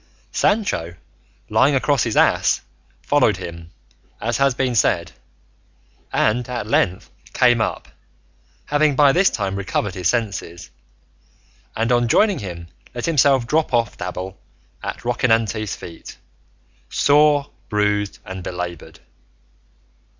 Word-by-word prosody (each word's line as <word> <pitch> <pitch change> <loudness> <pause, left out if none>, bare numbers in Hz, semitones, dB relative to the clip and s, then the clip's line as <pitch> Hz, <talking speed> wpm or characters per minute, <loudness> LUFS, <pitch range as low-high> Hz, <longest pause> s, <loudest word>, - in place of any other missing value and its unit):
Sancho, 90 - 0 0.5
lying 140 +1 +3
across 135 0 +2
his 115 -2 -1
ass, - - +3 0.4
followed - - +2
him, 85 -1 -8 0.5
as 120 +1 -1
has 135 -2 +2
been 130 -2 0
said, 85 -8 +1 1.0
and 120 +3 +1
at 120 -4 -3
length 95 -4 0 0.2
came 120 -2 +4
up, - - -2 0.8
having 145 -1 +2
by 145 0 +6
this 185 +6 +4
time 100 -2 -3
recovered 100 0 -2
his 90 -2 -1
senses, 95 - -3 1.0
and 115 +2 0
on 120 -1 +3
joining 200 - +3
him 85 -4 -7 0.3
let 120 - -3
himself 140 -5 +3
drop 150 0 +1
off 115 -2 0
Dapple 90 +1 -6 0.4
at - - -6
Rocinante's 115 -4 0
feet, 85 -1 -11 0.7
sore, 145 0 +3 0.2
bruised, 105 -1 0
and 95 0 -7
belaboured. 90 -2 -6
115 Hz, 115 wpm, -21 LUFS, 95-135 Hz, 1.0 s, by